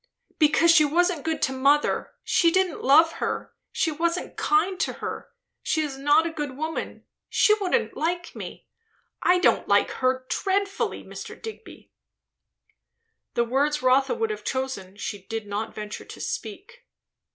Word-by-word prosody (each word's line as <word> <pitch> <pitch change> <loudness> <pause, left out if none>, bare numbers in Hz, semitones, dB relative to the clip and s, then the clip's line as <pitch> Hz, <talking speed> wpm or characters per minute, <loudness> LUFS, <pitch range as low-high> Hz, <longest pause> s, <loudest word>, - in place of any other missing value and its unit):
"Because 320 +2 +5
she 320 -2 +6
wasn't 340 +1 +1
good 320 0 -2
to 265 - +1
mother 280 +3 +1
she 340 - +3
didn't 370 -1 +1
love 315 +5 +6
her - - -3 0.2
she 320 - 0
wasn't 335 +3 -2
kind 390 -2 +1
to - - 0
her. - - -6 0.3
She 315 - 0
is 285 -3 -4
not 290 +4 +3
a 335 - -2
good 295 -4 -5
woman. 315 +2 -4 0.2
She 425 - +4
wouldn't 395 +5 0
like 345 +3 -2
me. - - -8 0.6
I 360 - +4
don't 360 - +2
like - - +3
her 255 0 0
dreadfully, 395 +4 -1
Mr. - - -9
Digby!" 445 0 -10 1.4
The 235 - +3
words 280 +4 0
Rotha 265 - +3
would 450 -1 -1
have 425 - -6
chosen 260 -8 -4
she 205 -1 -5
did 225 -1 -4
not 205 +2 -4
venture 210 -1 -7
to - - -11
speak. - - -6
310 Hz, 150 wpm, -25 LUFS, 265-355 Hz, 1.4 s, she